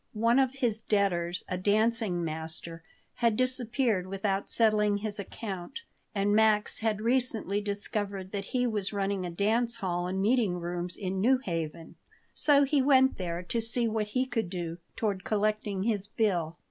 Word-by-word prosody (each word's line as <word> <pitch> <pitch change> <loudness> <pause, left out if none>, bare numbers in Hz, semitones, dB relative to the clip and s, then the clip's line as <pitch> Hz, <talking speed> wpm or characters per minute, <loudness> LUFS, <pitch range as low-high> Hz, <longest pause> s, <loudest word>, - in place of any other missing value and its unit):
One 230 +4 +3
of 265 -1 +2
his 235 -5 0
debtors, 185 -5 0
a 180 - -3
dancing 210 -2 +1
master, 160 +1 -3 0.4
had 230 -3 +2
disappeared 245 -6 +1
without 195 +1 -2
settling 210 -2 +3
his 210 0 -2
account 195 - -6 0.3
and 200 +1 +1
Max 215 -1 +3
had 220 -2 -1
recently 230 -4 0
discovered 200 -1 -3
that 200 -1 -4
he 250 +4 0
was 210 -5 -1
running 195 -2 -1
a - - -4
dance 225 +7 +1
hall 180 -4 -2
and 190 +1 -2
meeting 215 -2 +2
rooms 175 +1 -3
in 190 -1 -3
New 255 +5 +4
Haven; 165 - -5 0.4
so 285 -1 +4
he 280 0 +2
went 265 -1 +4
there 175 -1 -4
to 230 +6 -2
see 230 +1 +4
what 215 -1 -1
he 255 - +2
could 225 -7 -2
do 175 -2 -5 0.2
toward 200 -4 -2
collecting 210 -2 -1
his 205 -3 -1
bill. 175 -8 -1
205 Hz, 160 wpm, -29 LUFS, 185-230 Hz, 0.4 s, New